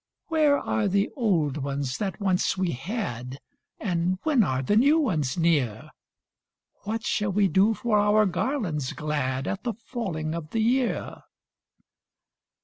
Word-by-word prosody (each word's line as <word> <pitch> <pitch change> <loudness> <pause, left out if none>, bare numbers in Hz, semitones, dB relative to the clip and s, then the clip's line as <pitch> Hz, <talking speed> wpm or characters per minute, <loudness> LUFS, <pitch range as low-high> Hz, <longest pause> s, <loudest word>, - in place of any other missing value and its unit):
Where 305 -3 +4
are 210 -6 -1
the 200 +1 +1
old 170 - +1
ones 140 -2 -3
that 200 -1 -3
once 190 -2 +1
we 185 -2 0
had, 130 - -4 0.4
And 180 -2 0
when 290 -8 +3
are 130 -6 -1
the 205 - +1
new 280 +8 +5
ones 160 - 0
near? 145 -11 +1 0.9
What 220 +2 -3
shall 205 -1 0
we 200 +1 +3
do 200 +4 +3
for 215 -2 +1
our 210 +1 +4
garlands 180 - -1
glad 145 -4 -2
At 200 - -3
the 240 -2 -1
falling 195 -9 -4
of 165 -2 -5
the 225 - -2
year?" 245 +2 0
190 Hz, 140 wpm, -26 LUFS, 150-225 Hz, 0.9 s, new